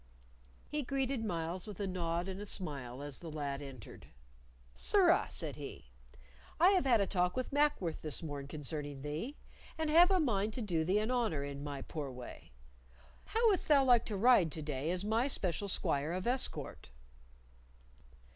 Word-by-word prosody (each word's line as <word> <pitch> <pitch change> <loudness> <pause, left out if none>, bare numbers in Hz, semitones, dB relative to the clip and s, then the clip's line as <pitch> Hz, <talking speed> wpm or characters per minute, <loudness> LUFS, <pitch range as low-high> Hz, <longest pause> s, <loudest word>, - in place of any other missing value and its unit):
He 300 - -2
greeted 270 -2 -1
Myles 175 -2 -3
with 205 -3 -8
a 200 - -1
nod 175 -1 -2
and 190 +1 -5
a - - -5
smile 140 -9 -3
as 145 -2 -5
the 170 - -8
lad 145 -2 -3
entered. 135 -7 -10 0.7
"Sirrah," 375 - +4
said 155 -5 -3
he, 140 - -9 0.7
"I 350 +3 +7
have 375 -7 +3
had 235 -5 +4
a - - +3
talk 180 +2 0
with 255 +1 -3
Mackworth 290 - +1
this 155 +1 -2
morn 145 -3 -5
concerning 145 -1 -5
thee, 160 - -4 0.4
and 315 -1 -1
have 345 +3 +7
a 380 -1 +3
mind 215 - +1
to 250 - -3
do 170 -6 0
thee 185 +5 +2
an 215 +3 0
honor 220 - 0
in 140 0 -6
my 140 -2 -5
poor 150 -4 -5
way. 125 - -10 0.7
How 455 +2 +2
wouldst 385 -4 +1
thou 285 -3 +6
like 245 -3 +5
to 210 - -3
ride 200 -7 +5
to 155 - -5
day 145 0 -3
as 180 +2 -1
my 225 +5 +2
special 200 -6 -1
squire 150 -4 0
of 185 +1 -3
escort?" 250 - -2
185 Hz, 175 wpm, -34 LUFS, -, 0.7 s, I